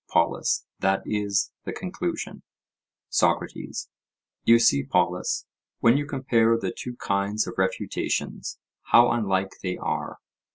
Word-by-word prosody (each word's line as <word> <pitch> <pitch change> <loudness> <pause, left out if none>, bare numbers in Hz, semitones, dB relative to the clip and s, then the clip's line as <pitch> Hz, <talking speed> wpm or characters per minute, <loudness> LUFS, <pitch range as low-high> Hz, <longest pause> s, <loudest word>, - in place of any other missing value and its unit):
POLUS: 85 0 +1
That 95 0 +1
is 100 -1 0
the - - -4
conclusion. - - -4 0.7
SOCRATES: - - 0 0.6
You 115 - +7
see, 70 -12 +4
Polus, 70 - 0 0.3
when 115 +2 +5
you 145 0 0
compare 115 -5 +2
the 115 - -3
two 125 -1 -6
kinds 100 0 0
of - - -6
refutations, 95 0 -2 0.3
how 120 +1 +6
unlike 95 -4 0
they 90 -1 -2
are. - - -3
105 Hz, 120 wpm, -26 LUFS, 95-115 Hz, 0.7 s, You